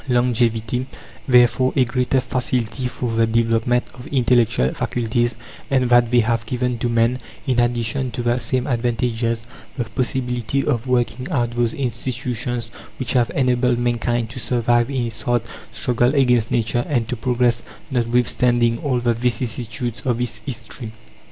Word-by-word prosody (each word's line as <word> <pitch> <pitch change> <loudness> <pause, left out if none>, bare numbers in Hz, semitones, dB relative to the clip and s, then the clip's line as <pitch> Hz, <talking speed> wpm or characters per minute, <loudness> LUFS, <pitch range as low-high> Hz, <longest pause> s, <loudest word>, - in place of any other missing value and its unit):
longevity, 120 0 +1 0.4
therefore 125 0 +4
a 130 - +4
greater 125 +2 +1
facility 125 -1 -1
for 125 -1 -3
the 115 0 +2
development 115 +2 +2
of 125 - -11
intellectual 120 - +2
faculties; 120 0 -1 0.3
and 130 -2 +2
that 120 -1 +5
they 120 0 +4
have 115 0 0
given 125 0 -1
to 120 - 0
men, 115 +2 +2 0.3
in 130 -3 +1
addition 120 +2 0
to 120 - -4
the 120 0 +2
same 125 +1 -1
advantages, 115 -2 -1 0.3
the 125 - 0
possibility 125 +3 -1
of 120 +1 -1
working 125 0 0
out 120 -8 0
those 120 -1 0
institutions 120 -2 -3 0.3
which 130 - -2
have 120 -2 +3
enabled 125 -2 +2
mankind 120 -1 0
to 120 +3 -8
survive 120 0 +1
in 130 -3 -1
its 115 -2 -5
hard 120 -1 +1 0.3
struggle 125 +2 +1
against 125 -5 +3
Nature, 120 +1 +1
and 120 -6 0
to 125 - -2
progress, 120 0 +1 0.3
notwithstanding 120 -1 +2
all 130 -4 0
the 120 -1 +2
vicissitudes 120 0 -3
of 120 -2 0
its 120 -2 -3
history. 115 -1 -6
120 Hz, 150 wpm, -21 LUFS, 115-125 Hz, 0.4 s, that